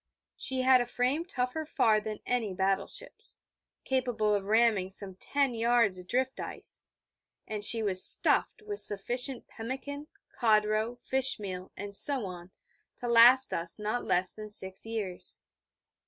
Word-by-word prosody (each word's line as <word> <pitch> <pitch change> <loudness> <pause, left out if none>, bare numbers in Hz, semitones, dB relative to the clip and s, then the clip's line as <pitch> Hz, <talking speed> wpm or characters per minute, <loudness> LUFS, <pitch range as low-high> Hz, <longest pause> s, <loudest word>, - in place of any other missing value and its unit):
She 260 -1 -2
had 255 -1 +5
a 245 - -3
frame 255 +7 -1
tougher 255 0 -2
far 235 -8 +2
than 215 0 -6
any 225 -6 -1
battle 190 +1 0
ship's, - - -7 0.5
capable 245 -5 0
of 200 -1 -1
ramming 215 -3 +2
some 195 0 -4
ten 275 +7 -1
yards 230 -4 +2
of 180 - -12
drift 260 +4 -1
ice; - - -5 0.6
and 210 -1 -5
she 225 +1 +5
was 185 -3 +2
stuffed 435 - +3
with 415 -1 -6
sufficient 245 +5 0
pemmican, 270 +5 -7 0.3
codroe, 215 +1 +1
fish 265 -2 +1
meal, 185 -2 -7
and 205 0 -7
so 270 0 +3
on, 180 -1 -9 0.5
to 245 - -6
last 240 +3 +6
us 170 0 -1
not 215 +3 -3
less 180 +1 +1
than 215 0 -9
six 190 0 -3
years. 210 -6 -2
225 Hz, 150 wpm, -29 LUFS, 200-255 Hz, 0.6 s, last